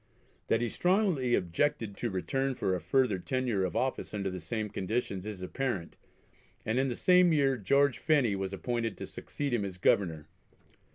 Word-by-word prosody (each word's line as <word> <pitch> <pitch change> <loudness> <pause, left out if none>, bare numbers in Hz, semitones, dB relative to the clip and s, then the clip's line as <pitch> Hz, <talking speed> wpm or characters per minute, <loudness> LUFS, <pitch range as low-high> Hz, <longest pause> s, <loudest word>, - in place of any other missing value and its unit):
That 115 - +2
he 120 - 0
strongly 180 - +2
objected 105 - -1
to 120 - -2
return 135 +8 -1
for 95 -6 0
a 90 - -2
further 105 +3 +2
tenure 120 -1 -1
of 90 -3 -2
office 130 -4 -1
under 100 -2 -2
the 90 - -5
same 110 +2 -3
conditions 100 -1 -3
is 100 -4 -6
apparent, 100 -4 -3 0.7
and 110 +3 +1
in 135 0 +1
the 120 - -2
same 180 +2 +5
year 140 -4 +3
George 140 +4 +2
Phenney 140 -10 +2
was 95 -1 -3
appointed 115 +2 -2
to - - -5
succeed 145 -3 -5
him 115 -4 +1
as 95 -2 -5
Governor. 85 -5 +1
115 Hz, 175 wpm, -30 LUFS, 95-135 Hz, 0.7 s, same